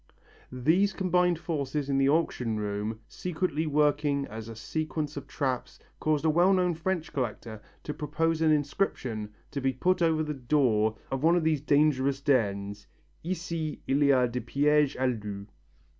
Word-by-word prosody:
These 165 +11 +2
combined 180 -2 +2
forces 150 -3 -3
in 135 -1 +1
the 135 0 +3
auction 125 -7 0
room 105 +2 -3
secretly 165 -3 -2
working 145 -1 +2
as 110 -2 -8
a 115 - -8
sequence 155 +5 -3
of 140 - -7
traps 130 -4 -3 0.2
caused 155 0 0
a - - +4
well 175 +5 +4
known 180 -2 +2
French 165 0 -3
collector 115 -4 -4 0.2
to 150 - -4
propose 155 +2 -1
as 160 - +3
an - - +5
inscription 130 - -2 0.2
to 140 - -3
be 135 0 +1
put 180 +8 +1
over 160 -2 +2
the 150 -1 -3
door 120 -5 +1
of 135 -1 -2
one 165 +3 +4
of 175 - +1
these 155 -3 +1
dangerous 140 -2 +2
dens: 100 -7 0 0.4
"Ici 165 -3 -4
il 140 +2 +2
y - - +5 0.2
a - - +3
des 125 +1 -3
pièges 145 +4 +2
à 130 - -1 0.2
loups." 100 -1 -6
145 Hz, 170 wpm, -28 LUFS, 125-160 Hz, 0.4 s, an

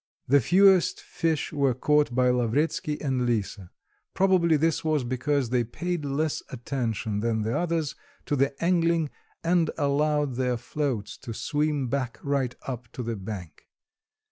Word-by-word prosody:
The 140 +2 +5
fewest 190 - +5
fish 160 -4 -2
were 140 -4 +2
caught 150 -1 +2
by 125 0 +4
Lavretsky 140 +5 0
and 130 -3 0
Lisa; 105 -5 -2 0.5
probably 180 -4 +4
this 160 +2 +1
was 155 -4 +1
because 130 +1 -1
they 125 -1 +2
paid 170 +7 -3
less 145 +2 -1
attention 115 -4 -2
than 110 0 0
the 110 +2 -1
others 165 -4 0 0.3
to 145 - 0
the 135 +1 +2
angling, 170 -3 +2 0.3
and 170 -1 +2
allowed 145 -2 +1
their 125 -2 0
floats 130 -4 -3
to 115 -4 -7
swim 150 -1 0
back 130 -1 -2
right 140 -3 0
up 125 -3 -6
to 125 - -5
the 115 0 -2
bank. 95 -5 -8
140 Hz, 145 wpm, -26 LUFS, 120-155 Hz, 0.5 s, The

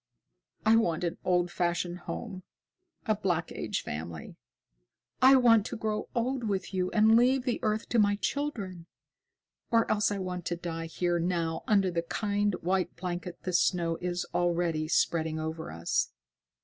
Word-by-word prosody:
I 220 +1 +6
want 170 -7 +1
an 170 -1 -2
old 175 -1 +1
fashioned 175 0 -1
home, 195 -5 -5 0.6
a 220 - +3
Black 175 -5 -1
Age - - -3
family. 80 +1 -6 0.9
I 265 +1 +8
want 235 -4 +6
to 235 - -5
grow 215 -1 -2
old 245 +1 -1
with 195 -2 -2
you 185 -1 0
and 220 +1 +5
leave 250 +2 +4
the 245 -2 -1
earth 215 +1 -1
to 235 - +2
my 205 -1 +4
children. 205 - -3 0.8
Or 230 -1 +4
else 210 -1 +2
I 205 - -1
want 180 -2 -4
to 175 - -1
die 165 -1 -5
here 175 +1 0
now 165 -2 -1
under 195 -4 +3
the 170 -1 0
kind, 205 +3 0
white 180 0 0
blanket 175 0 -5
the 185 - -3
snow 170 -1 +2
is 175 0 -2
already 170 -3 +1
spreading 160 -1 +1
over 160 +1 -4
us." 85 +1 -1
180 Hz, 160 wpm, -29 LUFS, 170-215 Hz, 0.9 s, I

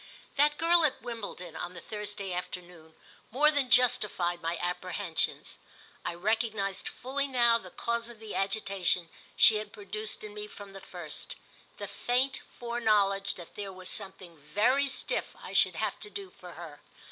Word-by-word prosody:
That 295 +1 +4
girl 335 +1 +4
at 300 - +2
Wimbledon, 200 -8 -6
on 175 - -5
the 175 - -8
Thursday 205 -1 -4
afternoon, 175 -2 -7 0.3
more 295 +6 +4
than 285 -4 +1
justified 210 -8 +3
my 165 +1 -1
apprehensions. 180 0 +1 0.4
I - - -3
recognised 210 0 0
fully 275 +3 -1
now 240 -3 +5
the - - -11
cause 235 0 -2
of 235 -2 -12
the 220 -1 -7
agitation 195 -4 +1 0.3
she 220 - +8
had 210 -1 -5
produced 215 +1 -5
in 210 -1 -7
me 210 0 -5
from 200 -1 -11
the 195 - -9
first—the 170 -6 -7
faint 255 +2 0
foreknowledge 210 -5 +1
that 175 -2 -11
there 200 -1 -5
was 185 -1 -4
something 190 -5 -3
very 235 - +2
stiff 260 - -2
I - - -9
should - - +5
have - - -2
to 420 - -6
do 395 -2 -6
for 180 -1 -12
her. 160 -3 -10
205 Hz, 160 wpm, -30 LUFS, 180-240 Hz, 0.4 s, she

